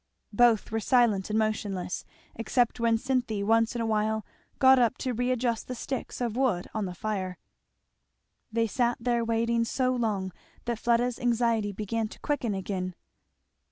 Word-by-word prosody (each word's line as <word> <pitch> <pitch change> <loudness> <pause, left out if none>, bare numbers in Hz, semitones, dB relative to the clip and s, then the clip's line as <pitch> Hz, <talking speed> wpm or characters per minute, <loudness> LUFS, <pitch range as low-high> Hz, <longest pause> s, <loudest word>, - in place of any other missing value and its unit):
Both 230 -1 +4
were 225 - 0
silent 220 -5 +2
and 210 - 0
motionless, 205 -4 -2 0.3
except 240 +2 0
when 230 -1 +3
Cynthy 245 -5 -1
once 225 +2 +2
in 235 - -1
a - - 0
while 220 0 0 0.3
got 265 -1 +6
up 240 0 +2
to 255 -2 -2
readjust 245 -1 0
the 255 - -4
sticks 265 +1 -5
of 235 -3 -2
wood 240 -9 +1
on 215 -2 -1
the 180 -1 -6
fire. 190 -3 -3 1.1
They 230 0 +1
sat 240 +2 0
there 235 0 +1
waiting 230 0 +1
so 255 +2 0
long 210 -6 -1 0.3
that 235 -2 -2
Fleda's 240 +1 +1
anxiety 230 -3 +1
began 215 +2 -2
to - - -13
quicken 245 -8 -1
again. 185 -2 -3
230 Hz, 155 wpm, -28 LUFS, 215-245 Hz, 1.1 s, got